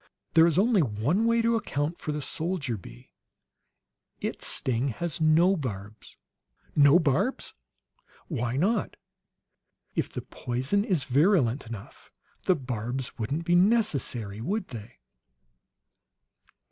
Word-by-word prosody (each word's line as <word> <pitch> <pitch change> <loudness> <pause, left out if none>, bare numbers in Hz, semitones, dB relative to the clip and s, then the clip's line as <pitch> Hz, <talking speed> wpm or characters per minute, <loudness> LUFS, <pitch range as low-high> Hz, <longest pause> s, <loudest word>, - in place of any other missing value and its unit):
"There 165 0 +7
is 165 -1 +1
only 210 0 +4
one 140 - +1
way 230 0 +3
to 230 0 +3
account 160 -6 -2
for 155 - -3
the 150 -1 -3
soldier 155 -4 -2
bee. - - -12 1.1
Its - - -3
sting 125 +1 0
has 170 +5 -4
no 165 +5 +5
barbs!" 105 - -7 0.6
"No 145 +2 +7
barbs?" 175 - 0 0.7
"Why 125 -5 -2
not? 205 +7 0 1.0
If - - -1
the - - -5
poison 130 +12 -1
is 180 - 0
virulent 140 - +2
enough, 110 -3 -10 0.4
the 185 - +4
barbs 125 -1 -4
wouldn't 145 +9 -2
be 175 - +2
necessary, 155 - +1
would 195 - -2
they? 120 0 -9
145 Hz, 120 wpm, -27 LUFS, 120-185 Hz, 1.1 s, There